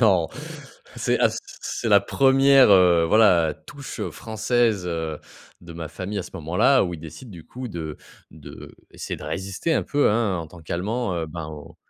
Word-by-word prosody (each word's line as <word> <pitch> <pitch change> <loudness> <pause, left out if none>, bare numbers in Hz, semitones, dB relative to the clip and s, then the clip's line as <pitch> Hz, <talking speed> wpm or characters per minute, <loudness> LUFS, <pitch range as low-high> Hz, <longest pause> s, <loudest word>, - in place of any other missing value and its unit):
Non, 95 -8 +4 0.7
c'est - - 0
à - - +5
c - - -5 0.2
c'est 115 - -3
la 100 -1 +6
1re, 135 +3 +5
heu, 90 -3 +5
voilà, 85 -7 +4
touche 140 -1 -9
française, 110 -2 0
heu, 80 -3 -3 0.4
de 85 -1 -11
ma 80 -2 -6
famille, 100 +2 -5
à - - -2
ce - - -11
moment-là, 90 - +3
où 90 - -4
ils 80 - -10
décident, 80 - -11
du 85 -5 -11
coup, 125 0 -7
de 80 -5 -6 0.4
d'essayer 75 -1 -10
de - - -12
résister 100 - -3
un - - +1
peu, 145 -6 +2
hein, 105 -5 0
en 80 - -5
tant 90 0 -14
qu'allemands, 95 +6 -2
heu, 85 -2 -3
ben, 80 0 -7
au 75 -2 -10
95 Hz, 180 wpm, -23 LUFS, 85-115 Hz, 0.7 s, la